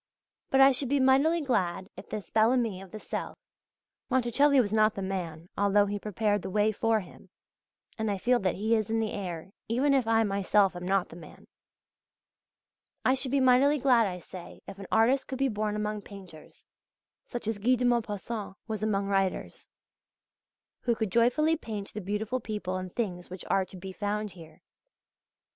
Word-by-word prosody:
But 270 - +4
I 270 0 +8
should 265 0 0
be 285 0 +2
mightily 275 +6 +4
glad 190 - -1
if 190 - -11
this 210 -2 -6
Bel 220 +1 +4
Ami 225 -7 0
of 195 - -11
the 215 - -8
South - - -5 0.7
(Monticelli 260 +3 +3
was 215 -4 +1
not 215 0 +3
the 195 - -4
man, 175 -4 -4
although 205 0 +3
he 205 0 -3
prepared 210 0 0
the - - -5
way 210 +2 +2
for 220 +1 +1
him, 180 - -15 0.7
and 220 -1 0
I 200 - -1
feel 245 +6 +2
that 185 -4 0
he 220 +3 +1
is 215 -2 -1
in 225 0 +1
the 220 -1 -1
air, 180 -2 -5 0.2
even 265 +5 +2
if 260 -4 +2
I 225 0 +4
myself 200 -1 +2
am 175 0 -6
not 195 -1 +1
the - - -11
man) 170 - -13 1.6
I 260 - +5
should 265 0 0
be 280 +2 +2
mightily 260 +3 +4
glad, 245 -5 +4
I 180 -2 -4
say, 180 0 -11
if 195 0 -9
an 195 - -8
artist 235 +5 +3
could 265 - -4
be 270 0 +1
born 210 -1 -2
among 210 0 -2
painters, 185 -7 -13 0.6
such 240 -3 -5
as 220 -2 -2
Guy 250 +5 +3
de 250 0 -1
Maupassant 220 -3 -2
was 215 -1 -4
among 200 -2 0
writers, 195 -1 -2 1.1
who 235 -2 0
could 220 -4 -2
joyfully 250 - +3
paint 215 -9 -7
the 215 - -5
beautiful 210 +6 -2
people 210 -6 -4
and 185 -1 -6
things 180 -6 -4
which 185 0 -8
are 195 -1 +2
to 185 - -12
be 190 +1 -7
found 205 +1 -3
here. 160 -3 -15
215 Hz, 190 wpm, -28 LUFS, 195-240 Hz, 1.6 s, I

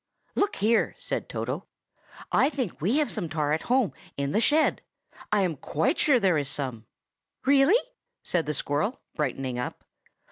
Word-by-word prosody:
"Look 405 0 +1
here!" 220 +3 +2
said - - -3
Toto, - - -4 0.6
"I 270 - +4
think 255 - -4
we 210 - +2
have 305 -1 +1
some 185 -7 -3
tar 150 -1 0
at 160 - 0
home, 250 -5 +3 0.2
in 140 0 -1
the 215 - +2
shed. 305 +6 +3 0.5
I 210 -1 +3
am 175 -4 0
quite 150 +3 0
sure 275 -5 +5
there 185 -7 +3
is 140 -2 -3
some." 125 -6 -4 0.6
"Really?" 280 - +6 0.5
said 170 -4 0
the 150 - 0
squirrel, 150 - -1
brightening 130 -4 -2
up. 125 - -5
180 Hz, 165 wpm, -27 LUFS, -, 0.6 s, Really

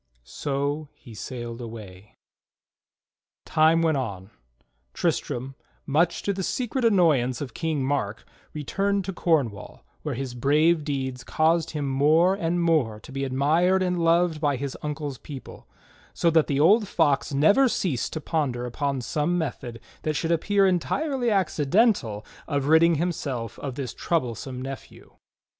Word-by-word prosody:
So 140 - -3
he 120 - -14
sailed 120 +2 -6
away. 105 -4 -10 1.3
Time 160 +1 +3
went 160 -3 +2
on. 100 -6 -5 0.6
Tristram, 130 +3 -2 0.3
much 160 +4 +1
to 200 - 0
the 190 - -4
secret 250 +6 -2
annoyance 160 - +3
of 135 -5 -6
King 155 -5 -1
Mark, 120 -7 -2 0.3
returned 195 +7 -1
to 195 - -4
Cornwall, 135 - -1 0.2
where 150 -4 -3
his 130 0 -4
brave 150 +6 +3
deeds 130 -4 -3
caused 165 +3 +1
him 145 -2 -2
more 155 +7 +4
and 175 -3 -1
more 140 -11 +1
to 120 - -13
be 135 +1 -3
admired 160 +8 +2
and 180 -2 0
loved 165 -1 +2
by 145 -3 +2
his 135 +1 -4
uncle's 150 -3 -4
people; 140 -3 -10 0.5
so 170 - +2
that 160 -1 +3
the 140 -1 0
old 205 +8 +5
Fox 145 -7 +1
never 180 - +4
ceased 170 - -1
to 155 - -3
ponder 135 -7 -1
upon 135 +2 -2
some 150 +7 -1
method 125 -7 -4 0.2
that 155 -1 -2
should 165 +2 -1
appear 195 +4 +2
entirely 245 - 0
accidental 175 - +1 0.2
of 140 -1 -1
ridding 160 +2 +5
himself 140 -8 -3
of 135 -3 -5
this 130 -4 -4
troublesome 130 -4 -2
nephew. 135 0 -9
150 Hz, 145 wpm, -25 LUFS, 130-170 Hz, 1.3 s, old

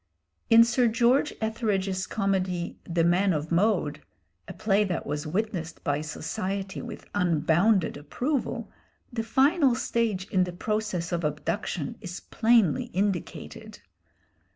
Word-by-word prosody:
In 230 0 +9
Sir 240 +1 +2
George 240 +6 +3
Etheredge's 200 -4 -1
comedy, 190 -4 -1
'The 170 -1 +1
Man 180 +3 +3
of 155 +1 -3
Mode,' 170 -5 +1 0.5
a - - -7
play 210 -1 +2
that 185 -4 -2
was 150 +2 -3
witnessed 180 -2 -3
by 145 -1 0
society 190 +5 -4
with - - -8
unbounded 175 +1 +2
approval, 245 - -3 0.4
the 230 - -1
final 265 +4 +3
stage 225 -6 -1
in 185 -2 +3
the 180 -1 -4
process 210 -2 -2
of 170 -1 -1
abduction 150 +2 -3
is 180 0 -6
plainly 225 -8 +2
indicated. 190 -1 -3
190 Hz, 125 wpm, -27 LUFS, 170-220 Hz, 0.5 s, In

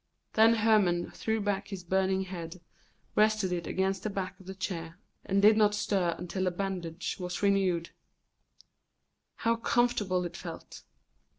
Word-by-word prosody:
Then 225 +1 +6
Hermon 210 -6 +3
threw 220 0 -1
back 200 -1 -1
his 195 -3 -7
burning 190 +1 +1
head, 180 -2 -7 0.6
rested 215 -3 +3
it 175 -1 -2
against 190 0 0
the 215 - -2
back 195 -1 -4
of 190 - -16
the 190 - -6
chair, 170 -3 -5 0.3
and 195 +1 +1
did 215 +1 +8
not 210 -1 +4
stir 185 -5 0
until 185 +2 -3
the - - +3
bandage 180 -2 -4
was 180 +2 -4
renewed. 190 -4 +2 1.4
How 230 0 +1
comfortable 230 -6 +1
it 175 0 -6
felt! 165 -2 -8
190 Hz, 150 wpm, -30 LUFS, 180-210 Hz, 1.4 s, did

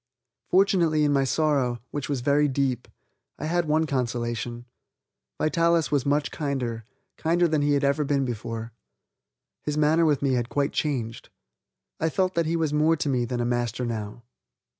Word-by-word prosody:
Fortunately 175 -5 +3
in 145 -1 +3
my 135 -1 +3
sorrow, 135 -4 +1
which 145 -1 -4
was 140 -4 -1
very 145 +3 +3
deep, 130 -3 -1 0.5
I - - -5
had 170 +1 0
one 155 +1 +2
consolation; 120 -3 -2 0.7
Vitalis 170 0 +2
was 140 -2 +1
much 145 +1 +1
kinder, 125 -7 -3 0.3
kinder 170 +2 +2
than 155 -2 +1
he 145 0 +2
had 140 0 +1
ever 140 +2 +2
been 140 -1 +1
before. 115 -1 -5 0.9
His 150 0 -3
manner 155 +2 +4
with 145 -3 +1
me 135 -2 +2
had 120 -1 -1
quite 140 0 0
changed. 120 -7 -2 0.7
I 160 - +1
felt 185 +2 0
that 170 -1 0
he 165 - 0
was 160 -3 0
more 155 +2 +3
to 150 -2 -2
me 125 -3 +1
than 120 0 -2
a - - 0
master 120 0 -1
now. 110 0 -5
140 Hz, 170 wpm, -25 LUFS, 120-155 Hz, 0.9 s, manner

